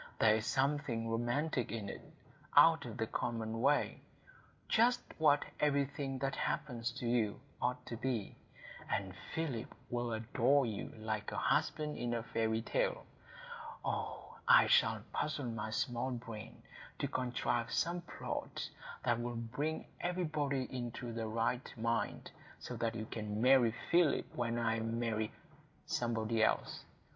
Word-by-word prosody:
There 110 - +6
is 110 - -3
something 135 -4 +1
romantic 120 +3 0
in 110 -3 -3
it,—out - - +2
of - - -6
the - - +1
common 115 -1 -2
way,—just 225 - 0 0.2
what 145 -2 +5
everything 140 -2 +1
that 135 +1 -1
happens 125 -5 -1
to 120 - -5
you 115 -3 +1 0.2
ought 125 0 0
to 115 - -5
be. 115 -4 -2 0.5
And 95 -2 -1 0.2
Philip 140 -8 -2 0.2
will 120 -1 -1
adore 125 +5 +3
you 110 -3 -4
like 110 -1 -3
a - - -4
husband 150 0 +1
in 120 -1 0
a 115 - -2
fairy 115 -1 0
tale. - - 0 0.8
Oh, - - -3
I - - +9
shall - - +4
puzzle 150 -3 -1
my 115 -2 -3
small 120 +3 -1
brain 115 -3 -7 0.3
to - - -1
contrive 120 -2 -1
some 175 +1 +1
plot 175 - -4 0.3
that 120 -1 +2
will 120 0 -3
bring 130 +7 -2
everybody 155 -6 0
into 120 -1 -4
the 115 -1 -2
right 115 +3 0
mind, 115 -1 -1 0.3
so - - -6
that 115 0 0
you 110 -1 -4
may 110 - -2
marry 115 +3 +4 0.2
Philip 170 -2 +3
when 120 -1 -1
I 115 -1 +1
marry—somebody 115 0 -2
else. - - +1
120 Hz, 135 wpm, -35 LUFS, 115-140 Hz, 0.8 s, I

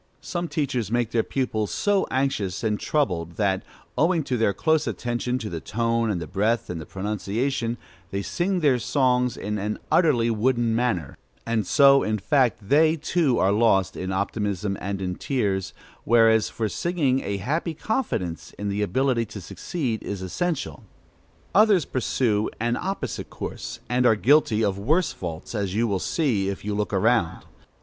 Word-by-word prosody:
Some 175 -1 -3
teachers 135 - -2
make 120 0 0
their 115 - +2
pupils 110 -5 -2
so 205 -1 +1
anxious 130 -9 -1
and 105 -2 0
troubled 90 - -1
that, 95 -2 0 0.3
owing 165 0 +2
to 130 - -2
their 110 -3 +2
close 160 - +1
attention 120 +1 -2
to 110 - -5
the 85 -5 -4
tone, 115 +4 0
and 100 -4 -1
the 85 - -5
breath, 105 +6 0
and 85 -2 -5
the 75 - -10
pronunciation, 110 +5 -2 0.3
they 100 0 -3
sing 180 - -1
their 135 -5 +3
songs 125 -1 +1
in 105 +1 -3
an 105 +2 -2
utterly 125 -9 +3
wooden 115 0 +1
manner, 115 - -1 0.3
and 110 -4 -1
so 140 0 +6
in 110 0 0
fact 120 -2 +1
they, 155 +5 +4
too, 155 -4 +1
are 95 - +3
lost 100 -3 +3
in 95 +1 -4
optimism 100 0 -1
and 100 0 -3
in 90 -1 -3
tears; 100 -8 -1 0.3
whereas, 115 -1 +4
for 110 - -2
singing, 145 - 0
a 100 0 -3
happy 155 - -2
confidence 150 - -3
in 105 0 -3
the 100 +1 -1
ability 115 +4 +1
to 105 - -9
succeed 120 - -4
is 100 -2 -5
essential. 145 - -3 0.7
Others 205 -6 +5
pursue 115 -4 0
an 120 +1 0
opposite 195 +7 -4
course, - - -6
and 125 0 +2
are 110 - +5
guilty 115 -2 +3
of 100 -1 -1
worse 155 - +1
faults, 85 +1 -6
as 100 -3 -2
you 115 +2 +2
will 100 -3 0
see 110 - 0
if 100 0 -6
you 105 - -1
look 105 0 -1
around. 105 -2 +1
115 Hz, 170 wpm, -24 LUFS, 100-135 Hz, 0.7 s, so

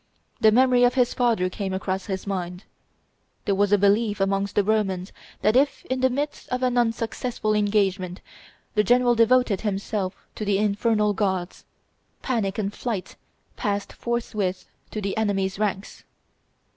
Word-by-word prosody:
The 220 - +6
memory 250 +1 +4
of 245 +1 +4
his 250 -2 +2
father 230 -7 +2
came 190 +1 -4
across 190 0 -3
his 190 -2 -4
mind. 180 -1 -4 0.8
There 200 - +2
was 200 +1 +2
a 205 - +6
belief 205 +2 +2
amongst 195 +1 0
the 205 - +4
Romans 195 -3 0 0.3
that 215 +2 +3
if 275 +1 +2
in 260 - 0
the 260 0 +3
midst 290 +4 -3
of 250 +1 -2
an 250 -1 +1
unsuccessful 230 -1 0
engagement 200 -3 0 0.5
the 210 - +3
general 245 +3 +4
devoted 235 -2 +3
himself 200 -2 -2 0.2
to - - -5
the 200 -1 +1
infernal 210 +1 +1
gods, 190 -3 -2 0.6
"panic 215 -7 -1
and 205 -1 -2
flight" 215 -6 -4 0.4
passed 200 -1 -2
forthwith 215 -6 -2 0.2
to 215 - -5
the 195 -1 -2
enemies' 195 -3 0
ranks. 205 -2 -3
210 Hz, 150 wpm, -24 LUFS, 195-235 Hz, 0.8 s, The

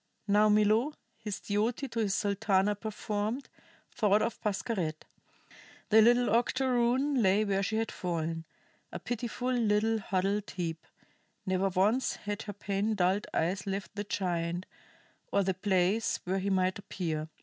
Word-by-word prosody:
Now 210 +1 +4
Milo, 215 +7 +3 0.2
his 215 -3 -5
duty 220 +6 -1
to 230 - -3
his 205 -3 +1
Sultana 200 -1 +2
performed, 215 +3 -3 0.4
thought 210 -1 +3
of 230 -1 -3
Pascherette. 195 -7 -2 0.8
The 220 0 +7
little 240 +1 +4
octoroon 255 +3 +2
lay 200 +1 +3
where 195 -1 +1
she 210 +3 -1
had 225 0 -1
fallen, 165 -2 -3 0.5
a - - -4
pitiful 245 +1 -3
little 220 -1 +2
huddled 200 +1 -1
heap; 165 -3 -4 0.6
never 190 0 +1
once 205 +8 +2
had 205 +1 -5
her 205 - -6
pain 200 +2 -1
dulled 190 +2 +1
eyes 185 +4 -1
left 195 0 -3
the 205 - -2
giant, 175 -3 -2 0.7
or 200 - +3
the 190 0 0
place 190 +3 +1
where 190 +2 0
he 195 +1 -1
might 185 0 +1
appear. 160 -6 -4
205 Hz, 140 wpm, -30 LUFS, 190-225 Hz, 0.8 s, The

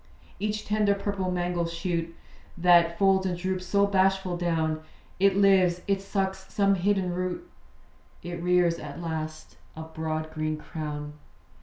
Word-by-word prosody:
Each 210 +1 -2
tender 210 -1 +2
purple 200 -2 -2
mango 175 -1 -1
shoot, 165 -1 -3 0.4
That 170 -1 +5
folds 190 -1 +3
and 180 -1 -2
droops 185 0 -3
so 200 +2 +3
bashful 190 -2 +2
down; 160 -3 0 0.4
It 195 0 +4
lives; 190 -3 +4
it 195 -1 +1
sucks 190 -1 -3
some 200 -1 +3
hidden 190 -1 +1
root; 185 - -3 0.8
It 175 0 -5
rears 175 -1 +2
at 145 +1 -8
last 155 -2 -5 0.2
a 160 - -6
broad 160 -1 -4
green 155 0 -2
crown. 150 -2 -6
180 Hz, 140 wpm, -27 LUFS, 165-195 Hz, 0.8 s, That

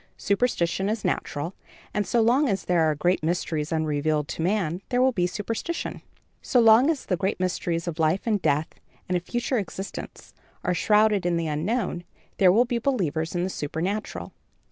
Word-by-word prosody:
Superstition 200 -3 0
is 220 0 -2
natural, 150 +5 -2 0.4
and 205 -2 -1
so 235 +5 +2
long 255 +6 +3
as 195 -2 -1
there 165 -3 +3
are 155 - 0
great 175 +5 +1
mysteries 160 -2 -1
unrevealed 155 -1 0
to - - -4
man, 180 -1 0
there 245 - +1
will 260 +1 +4
be 180 -7 +1
superstition. 225 - -4 0.4
So 250 - +2
long 230 +5 +6
as 315 -5 -1
the 185 - 0
great 190 +2 -1
mysteries 175 -2 -1
of 170 -1 -4
life 160 +5 +1
and 215 -4 +1
death 150 0 +1 0.3
and 180 - 0
a - - +2
future 240 +6 -1
existence 195 0 -7 0.3
are 180 - +1
shrouded 210 +2 +3
in 175 -1 +1
the 165 - -1
unknown, 175 +4 -1 0.4
there 185 -2 +7
will 230 +6 +4
be 240 -1 -1
believers 170 - -1
in 175 - 0
the 185 - -1
supernatural. 180 +9 -3
185 Hz, 180 wpm, -25 LUFS, 165-220 Hz, 0.4 s, there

